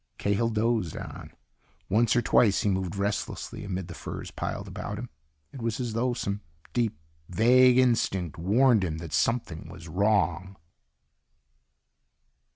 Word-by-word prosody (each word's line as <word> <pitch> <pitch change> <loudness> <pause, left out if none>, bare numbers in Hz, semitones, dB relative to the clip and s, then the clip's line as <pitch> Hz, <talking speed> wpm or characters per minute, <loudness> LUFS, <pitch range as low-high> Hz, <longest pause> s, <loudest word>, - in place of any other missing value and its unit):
Cahill 100 +3 +1
dozed 110 -5 0
on. - - -8 0.6
Once 115 +4 +3
or 120 - +3
twice 105 -3 +4
he 105 - +1
moved 95 -1 -1
restlessly 100 +1 -3
amid 95 -3 -4
the - - -8
furs - - -7
piled - - -4
about 100 - -5
him. 120 +2 -7 0.4
It 135 - -8
was 115 0 -2
as 120 -3 -2
though 120 +2 0
some 100 -3 -3 0.3
deep, 115 -10 0 0.3
vague 125 +6 +5
instinct 95 -9 +1
warned 110 +4 +4
him 80 -3 -2
that 80 -2 -7
something 85 -2 0
was 80 0 -10
wrong. 95 0 +1
105 Hz, 140 wpm, -27 LUFS, 95-120 Hz, 0.6 s, vague